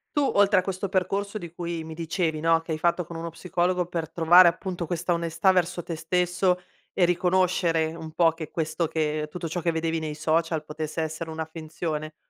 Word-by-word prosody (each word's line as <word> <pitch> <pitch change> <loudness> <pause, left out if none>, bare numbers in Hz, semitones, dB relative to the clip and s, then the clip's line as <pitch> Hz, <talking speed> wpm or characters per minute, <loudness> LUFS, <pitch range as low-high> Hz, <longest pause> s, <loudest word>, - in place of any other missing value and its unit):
Tu, 290 - +3
oltre 205 -4 +4
a - - +1
questo 190 +1 -3
percorso 195 +2 -1
di 170 -4 -8
cui 170 -2 -4
mi 160 - -7
dicevi, 160 -1 -2
no, 165 0 +4
che 165 0 -5
hai - - -2
fatto 170 +2 +1
con 170 - -9
uno 165 +1 -4
psicologo 180 +1 0
per 165 -2 -4
trovare, 170 +2 +7
appunto, 175 0 -4
questa 175 +1 -1
onestà 170 +2 +2
verso 180 -1 0
te 165 - -4
stesso 180 +2 +1 0.3
e 180 - +3
riconoscere 175 -2 +2
un 160 -1 -8
po' 165 0 +4
che 160 -2 -8
questo 160 0 -1
che 155 -1 -1
tutto 175 0 -4
ciò 175 +2 -3
che 170 - +1
vedevi 165 0 -1
nei 155 -1 -4
social 160 0 0
potesse 155 +1 -5
essere 160 +1 -4
una 160 0 -4
finzione. 155 -1 -5
165 Hz, 200 wpm, -26 LUFS, 160-180 Hz, 0.3 s, trovare